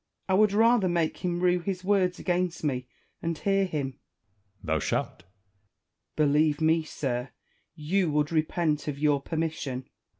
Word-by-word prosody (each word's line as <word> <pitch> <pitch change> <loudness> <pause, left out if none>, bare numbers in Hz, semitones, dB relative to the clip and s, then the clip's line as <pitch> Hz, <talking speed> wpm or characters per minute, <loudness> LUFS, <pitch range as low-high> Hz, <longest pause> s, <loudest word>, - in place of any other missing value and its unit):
Wallace. 190 - +2
I - - +3
would 210 -2 +4
rather 225 -2 +4
make 170 -2 0
him 175 -1 -2
rue 180 0 +3
his 185 +1 -4
words 185 -2 +2
against 180 -1 -1
me, 125 -4 -1 0.3
and 165 -1 -2
hear 195 +2 +1
him. 150 -6 -2
Edward. 100 - -18
Thou 80 0 +1
shalt. - - 0
Wallace. - - -22 0.9
Believe 150 0 +3
me, 160 +1 +3
sir, 130 -5 -3 0.5
you 170 +3 0
would 150 0 +1
repent 155 -1 0
of 145 -2 -3
your 145 -1 +2
per 160 - -5
mission. 145 -5 -3
160 Hz, 165 wpm, -27 LUFS, 145-180 Hz, 0.9 s, would